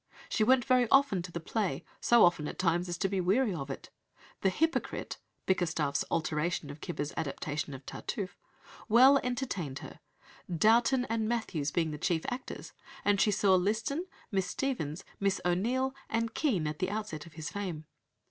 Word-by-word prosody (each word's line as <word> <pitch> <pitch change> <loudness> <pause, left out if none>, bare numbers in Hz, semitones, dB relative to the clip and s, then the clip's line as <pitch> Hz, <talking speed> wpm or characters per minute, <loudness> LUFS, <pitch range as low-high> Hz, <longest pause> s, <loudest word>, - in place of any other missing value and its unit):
She 215 - +2
went 250 +2 +4
very 255 -3 +3
often 270 -9 +4
to 175 0 -8
the 170 - -4
play, 195 +3 -2
so 235 -4 +6
often 165 -4 +2
at - - -6
times 175 0 +1
as 175 - -2
to 195 - +1
be 195 -1 0
weary 205 +5 +2
of 140 -5 -5
it. 135 - -7 0.5
The 190 - +4
Hypocrite 325 - -1 0.3
(Bickerstaff's 160 -6 +1
"alteration" 155 -1 -1
of 145 - -10
Cibber's 150 -4 -3
"adaptation" 145 -1 -3
of 130 0 -11
Tartuffe) 190 -4 -5 0.5
"well 260 +5 +7
entertained" 240 - -3
her, - - -11 0.5
Dowton 235 - +4
and 220 -1 0
Mathews 190 -11 -1
being 165 -1 0
the 150 - -6
chief 165 -1 0
actors; 255 +1 -6 0.3
and 205 -1 +3
she - - +4
saw 200 -1 +3
Liston, 220 - +1 0.2
Miss 190 -3 +1
Stephens, 180 - -2 0.2
Miss 195 -1 +1
O'Neill, 240 +10 +1 0.2
and 230 0 -1
Kean 215 - +1
at 150 0 -3
the 185 0 0
outset 205 -7 -4
of 165 - -14
his 160 -1 -6
fame. 180 -6 -4
190 Hz, 170 wpm, -31 LUFS, 160-230 Hz, 0.5 s, well